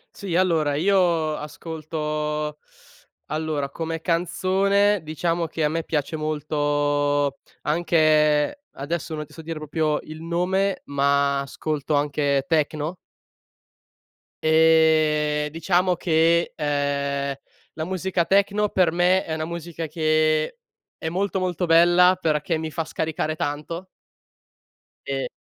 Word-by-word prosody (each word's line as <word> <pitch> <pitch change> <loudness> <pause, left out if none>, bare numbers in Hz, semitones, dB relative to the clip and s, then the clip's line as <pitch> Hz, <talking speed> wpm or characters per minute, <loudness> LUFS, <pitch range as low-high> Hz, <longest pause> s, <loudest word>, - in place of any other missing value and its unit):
Sì, 185 -4 -4
allora 165 -5 +2
io 170 -3 +2
ascolto 150 -1 -4 0.7
allora, 155 -2 -2
come 165 +1 -4
canzone 190 +4 +2
diciamo 165 +2 -1
che 160 0 -3
a 150 - +3
me 165 +1 -2
piace 150 0 -2
molto 145 -2 0 0.2
anche 155 - +2
adesso 160 +3 -4
non 150 0 -4
ti 150 - -19
so 160 - -10
dire 165 -1 -5
proprio 155 0 -1
il 155 +1 -10
nome, 185 +3 0
ma 140 0 +1
ascolto 150 +1 -3
anche 145 -1 +1
techno. 155 +1 0 1.5
Ehm, 155 -2 +3
diciamo 180 +3 +1
che, 170 0 +2
ehm, 140 -1 -1 0.4
la 155 - -4
musica 185 0 -1
techno 200 +1 +2
per 180 -3 +2
me 180 +2 +3
è 160 - -4
una 155 0 -2
musica 170 -1 -5
che 155 - +1 0.4
è 160 - -4
molto, 190 +2 -1
molto 180 -1 -1
bella 175 +2 +5
perché 155 0 0
mi 160 0 -4
fa 165 - -3
scaricare 155 0 -2
tanto. 155 +5 -4 1.2
E 135 -1 -2
155 Hz, 115 wpm, -23 LUFS, 150-170 Hz, 1.5 s, bella